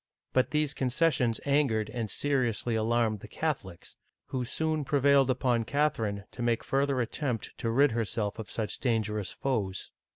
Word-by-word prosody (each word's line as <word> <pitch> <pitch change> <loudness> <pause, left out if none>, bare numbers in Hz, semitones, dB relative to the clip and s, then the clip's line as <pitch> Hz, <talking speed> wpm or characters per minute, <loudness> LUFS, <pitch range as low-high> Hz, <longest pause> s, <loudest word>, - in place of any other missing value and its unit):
But 130 - +3
these 150 -2 +1
concessions 130 -3 +1
angered 140 -7 +2
and 115 -3 -3
seriously 125 -5 0
alarmed 110 -1 +1
the 105 - -10
Catholics, 105 - -4 0.3
who 130 -1 -2
soon 155 +4 -1
prevailed 140 -1 +4
upon 125 -2 +2
Catherine 110 -8 0
to 125 - -8
make 120 -1 +1
further 135 -1 +1
attempt 120 -1 -3
to 115 - -1
rid 140 +5 +4
herself 110 -1 -2
of 110 - -6
such 110 -2 -4
dangerous 110 -5 0
foes. 105 -8 -2
120 Hz, 150 wpm, -29 LUFS, 110-140 Hz, 0.3 s, prevailed